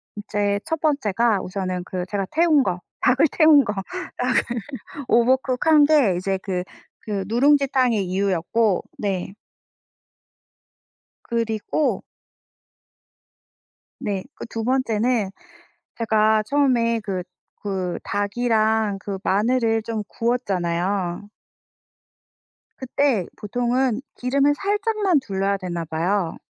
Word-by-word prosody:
이제 205 Hz, -1 st, -1 dB
1 320 Hz, -1 st, -2 dB
번째가 235 Hz, -, +1 dB
우선은 185 Hz, -1 st, -3 dB
그 180 Hz, -1 st, -4 dB
제가 200 Hz, -2 st, -1 dB
태운 315 Hz, -3 st, +4 dB
거 180 Hz, -4 st, -2 dB, 0.2 s
닭을 265 Hz, +5 st, +4 dB
태운 310 Hz, -3 st, +6 dB
거. 205 Hz, -, -2 dB, 0.4 s
닭을 255 Hz, +1 st, +2 dB, 0.7 s
오버쿡 255 Hz, +2 st, +2 dB
한 310 Hz, -2 st, +7 dB
게 280 Hz, -, +4 dB
이제 190 Hz, +2 st, -1 dB
그 180 Hz, -3 st, -2 dB, 0.4 s
그 200 Hz, -3 st, -3 dB
누룽지 275 Hz, +6 st, +4 dB
탕의 245 Hz, -6 st, +2 dB
이유였고 195 Hz, +2 st, +1 dB
네. 195 Hz, -2 st, -3 dB, 1.9 s
그리고 230 Hz, -2 st, -1 dB, 2.4 s
네. 195 Hz, -2 st, -3 dB
그 -, -, -7 dB
2 225 Hz, -, -4 dB
번째는 235 Hz, -3 st, +1 dB, 0.7 s
제가 220 Hz, -1 st, +3 dB
처음에 235 Hz, -3 st, +2 dB
그 190 Hz, -3 st, -3 dB, 0.4 s
그 185 Hz, -3 st, -2 dB
닭이랑 215 Hz, 0 st, 0 dB
그 195 Hz, 0 st, -5 dB
마늘을 225 Hz, +2 st, +2 dB
좀 220 Hz, -1 st, -4 dB
구웠잖아요. 190 Hz, -5 st, -1 dB, 1.5 s
그때 260 Hz, -6 st, 0 dB
보통은 245 Hz, +3 st, 0 dB
기름을 275 Hz, +3 st, +2 dB
살짝만 410 Hz, -2 st, +1 dB
둘러야 200 Hz, -5 st, -1 dB
되나 175 Hz, -3 st, -4 dB
봐요. 165 Hz, +3 st, -1 dB
220 Hz, 195 characters per minute, -22 LUFS, 195-255 Hz, 2.4 s, 한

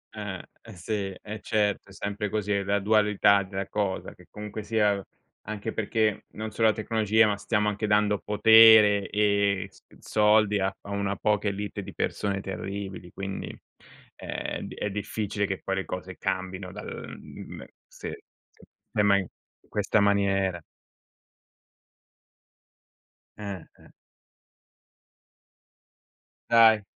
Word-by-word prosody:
Eh. -, -, -5 dB, 0.3 s
Eh 110 Hz, -, -11 dB
sì, 90 Hz, +5 st, -5 dB, 0.3 s
e 105 Hz, 0 st, -7 dB
certo, 105 Hz, -3 st, 0 dB
è -, -, -14 dB
sempre 105 Hz, +1 st, -3 dB
così, 105 Hz, -1 st, -2 dB
è 100 Hz, -1 st, +1 dB
la 100 Hz, +1 st, +1 dB
dualità 105 Hz, -1 st, +4 dB
della 95 Hz, 0 st, -5 dB
cosa, 100 Hz, -3 st, -2 dB
che -, -, -19 dB
comunque 105 Hz, +1 st, -7 dB
sia, 105 Hz, -3 st, +1 dB, 0.4 s
anche 110 Hz, +1 st, -5 dB
perché 110 Hz, -1 st, 0 dB
non 110 Hz, 0 st, -5 dB
solo 110 Hz, +1 st, +2 dB
la -, -, +2 dB
tecnologia, 110 Hz, 0 st, +2 dB
ma 105 Hz, -, +1 dB
stiamo 105 Hz, +1 st, 0 dB
anche 105 Hz, +1 st, -1 dB
dando 105 Hz, 0 st, +2 dB
potere 110 Hz, -1 st, +7 dB
e 100 Hz, -2 st, +1 dB
s -, -, -21 dB, 0.2 s
soldi 105 Hz, -1 st, +3 dB
a 95 Hz, -, +1 dB
a 100 Hz, -, -9 dB
una 100 Hz, 0 st, -1 dB
poca 105 Hz, 0 st, +1 dB
élite 100 Hz, +1 st, -4 dB
di -, -, -9 dB
persone 100 Hz, -1 st, -1 dB
terribili. 95 Hz, -1 st, -6 dB
Quindi 95 Hz, 0 st, -5 dB, 0.7 s
è -, -, -5 dB
di -, -, -7 dB
è 105 Hz, -, -2 dB
difficile 105 Hz, 0 st, -2 dB
che 95 Hz, -1 st, -4 dB
poi 95 Hz, -, -1 dB
le 95 Hz, -, -2 dB
cose 90 Hz, 0 st, -6 dB
cambino 95 Hz, -1 st, -3 dB
dal, -, -, -8 dB
mhmm, -, -, -10 dB, 0.2 s
sì, -, -, -8 dB, 0.4 s
sì -, -, -23 dB, 0.3 s
beh -, -, +1 dB
ma 100 Hz, -1 st, +5 dB
in 95 Hz, -3 st, -2 dB, 0.4 s
questa 105 Hz, +1 st, +1 dB
maniera 95 Hz, -3 st, +2 dB, 2.7 s
Eh, 100 Hz, -5 st, -6 dB, 0.2 s
eh. -, -, -19 dB, 2.6 s
Dai, 115 Hz, -2 st, +7 dB
100 Hz, 135 wpm, -27 LUFS, 100-105 Hz, 2.7 s, potere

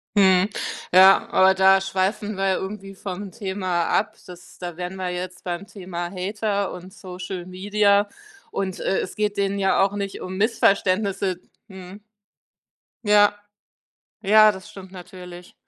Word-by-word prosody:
Mhm. 190 Hz, 0 st, +4 dB, 0.4 s
Ja, 190 Hz, +2 st, +7 dB
aber 190 Hz, 0 st, +5 dB
da 190 Hz, +1 st, +5 dB
schweifen 195 Hz, +2 st, -2 dB
wir 195 Hz, 0 st, -1 dB
ja 190 Hz, -, +2 dB
irgendwie 195 Hz, 0 st, -6 dB
vom 195 Hz, 0 st, -7 dB
Thema 185 Hz, -4 st, -2 dB
ab. 205 Hz, -, 0 dB
Das 180 Hz, -1 st, -14 dB
da 175 Hz, -2 st, -7 dB
wären 180 Hz, +1 st, -6 dB
wir 185 Hz, -1 st, -4 dB
jetzt 180 Hz, 0 st, -6 dB
beim 180 Hz, +3 st, -5 dB
Thema 175 Hz, -3 st, -6 dB
Hater 200 Hz, +1 st, -2 dB
und 180 Hz, +1 st, -10 dB
Social 185 Hz, -1 st, -7 dB
Media 200 Hz, +2 st, +1 dB, 0.4 s
und, 190 Hz, -2 st, -3 dB
äh, 190 Hz, -, 0 dB
es -, -, -7 dB
geht 210 Hz, -1 st, -1 dB
denen 200 Hz, 0 st, 0 dB
ja 195 Hz, 0 st, +2 dB
auch 200 Hz, +1 st, 0 dB
nicht 200 Hz, -1 st, -5 dB
um 185 Hz, +1 st, -6 dB
Missverständnisse 200 Hz, -3 st, +1 dB, 0.3 s
Mhm. 190 Hz, +2 st, -11 dB, 1.0 s
Ja. 205 Hz, 0 st, +5 dB, 0.9 s
Ja, 215 Hz, +1 st, +6 dB
das 190 Hz, +2 st, -11 dB
stimmt 190 Hz, -1 st, -12 dB
natürlich. 180 Hz, -1 st, -11 dB
190 Hz, 145 wpm, -23 LUFS, 185-200 Hz, 1.0 s, Ja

